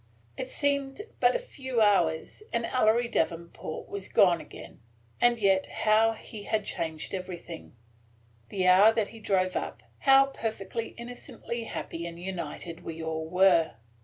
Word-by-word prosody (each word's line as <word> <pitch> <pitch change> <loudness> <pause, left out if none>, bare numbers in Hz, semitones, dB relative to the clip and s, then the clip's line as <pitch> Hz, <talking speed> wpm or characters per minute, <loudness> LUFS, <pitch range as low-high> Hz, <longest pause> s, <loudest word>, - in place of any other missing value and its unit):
It 255 - -5
seemed 280 +3 -1 0.2
but - - +4
a - - +4
few 260 - -4
hours, 185 - +2
and 235 0 0
Ellery 235 -1 +2
Davenport 165 -5 -3
was 200 -2 -6
gone 175 -4 +4
again; - - -12 0.4
and 240 0 +5
yet 195 -3 +3
how 220 +1 +3
he 215 -1 -10
had 215 -2 0
changed 160 -1 -4
everything! 175 -6 -7 0.7
The 185 -2 -1
hour 190 +4 +7
that 220 -3 0
he 225 - -12
drove 185 -3 +1
up, - - -4 0.2
how 270 0 +6
perfectly 225 -4 -4
innocently 235 -1 -7
happy 170 -5 -5
and 170 0 -9
united 170 -2 -5
we 165 0 -6
all 160 0 -3
were! 180 -3 +4
200 Hz, 145 wpm, -28 LUFS, 170-235 Hz, 0.7 s, hour